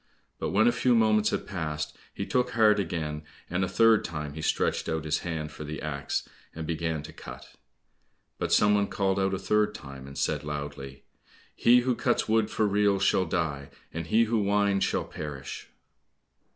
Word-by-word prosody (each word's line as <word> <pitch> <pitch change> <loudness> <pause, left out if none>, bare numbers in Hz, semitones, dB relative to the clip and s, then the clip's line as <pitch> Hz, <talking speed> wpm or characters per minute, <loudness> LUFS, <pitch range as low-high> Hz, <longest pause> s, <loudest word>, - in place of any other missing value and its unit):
But - - -2
when 110 +4 +4
a - - +6
few 120 +1 +2
moments 110 -2 +4
had - - -2
passed, 75 -5 -4 0.2
he - - -4
took 125 -1 +1
heart 110 -2 +5
again, 80 -5 -3 0.3
and 90 +2 +1
a - - +1
third 115 +3 +4
time 75 -3 -5
he 80 - -6
stretched 80 - 0
out 80 -1 -2
his 75 0 0
hand 80 -3 -4
for 75 - -8
the 75 +1 -5
axe, 70 -2 -3 0.3
and 80 0 -5
began 80 -1 -2
to - - -10
cut. - - -11 0.9
But - - -2
some 105 0 +5
one 100 -1 +2
called 95 -1 0
out 95 0 +1
a - - -2
third 105 +2 +1
time, 70 -6 -9
and 70 - -10
said - - 0
loudly, 70 -2 -6 0.5
"He 125 +1 +5
who 125 +1 +1
cuts - - 0
wood 110 -1 +2
for 110 - +1
reels 100 -1 +2
shall 95 -1 +3
die, 80 -5 -2 0.2
And 85 0 -4
he 115 +6 +4
who 115 0 +1
winds, 100 -1 +2
shall - - 0
perish." 70 -3 -7
90 Hz, 190 wpm, -28 LUFS, 75-105 Hz, 0.9 s, a